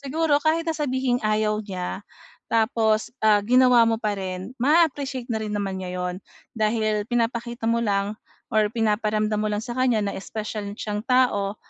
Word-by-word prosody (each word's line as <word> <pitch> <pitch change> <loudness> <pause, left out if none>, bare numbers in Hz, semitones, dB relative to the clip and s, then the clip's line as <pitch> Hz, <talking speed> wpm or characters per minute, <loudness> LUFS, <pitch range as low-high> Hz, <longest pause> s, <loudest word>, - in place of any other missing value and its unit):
siguro 290 +1 +1
kahit 315 +2 +1
sabihing 260 -4 -1
ayaw 215 0 +1
niya 185 -1 -5 0.5
tapos, 220 -1 +1
ah, 215 -1 +5
ginawa 250 0 +5
mo 225 - +2
pa 210 -2 -1
rin 185 +3 -5
ma-a-appreciate 280 -4 +2
na 220 - 0
rin 210 - -4
naman 195 -2 -2
niya 185 - -5
'yon 180 0 -2 0.4
dahil 215 -1 +1
pinapakita 235 0 -2
mo 235 0 +2
lang 200 +1 0 0.4
or 215 -1 +3
pinaparamdam 215 -1 0
mo 215 - 0
lang 210 - -1
sa 240 0 -6
kanya 250 -4 +2
na 200 -1 -2
special 210 0 -5
siyang 210 -1 -4
tao 230 -6 +2
220 Hz, 160 wpm, -24 LUFS, 210-250 Hz, 0.5 s, ah